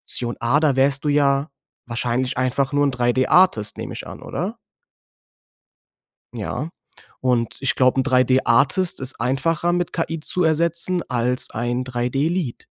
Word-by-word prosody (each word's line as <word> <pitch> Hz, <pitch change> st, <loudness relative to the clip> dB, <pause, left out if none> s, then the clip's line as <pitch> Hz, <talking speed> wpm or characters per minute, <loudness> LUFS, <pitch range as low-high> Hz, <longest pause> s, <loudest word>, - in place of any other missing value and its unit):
Option 120 Hz, -1 st, +1 dB
A“, 135 Hz, +6 st, +2 dB
da 145 Hz, -4 st, +2 dB
wärst 135 Hz, +1 st, +2 dB
du -, -, 0 dB
ja 140 Hz, 0 st, +2 dB, 0.4 s
wahrscheinlich 120 Hz, +2 st, -2 dB
einfach 130 Hz, +2 st, 0 dB
nur 145 Hz, 0 st, +2 dB
'n 135 Hz, -, 0 dB
3D-Artist, 125 Hz, -, +2 dB
nehme -, -, -6 dB
ich -, -, -8 dB
an, -, -, -10 dB
oder? -, -, -4 dB, 1.8 s
Ja, 155 Hz, -, -4 dB, 0.5 s
und 125 Hz, -3 st, 0 dB
ich 135 Hz, -3 st, 0 dB
glaube, 130 Hz, 0 st, +3 dB
'n 130 Hz, -, -1 dB
3D-Artist 130 Hz, +6 st, +2 dB
ist 130 Hz, -2 st, -1 dB
einfacher 150 Hz, +7 st, 0 dB
mit 175 Hz, -1 st, -1 dB
KI 165 Hz, -1 st, -3 dB
zu 180 Hz, +3 st, -1 dB
ersetzen 170 Hz, +2 st, +1 dB
als 125 Hz, 0 st, -1 dB
ein 120 Hz, +3 st, -2 dB
3D-Lead. 130 Hz, +5 st, -2 dB
135 Hz, 140 wpm, -21 LUFS, 125-155 Hz, 1.8 s, glaube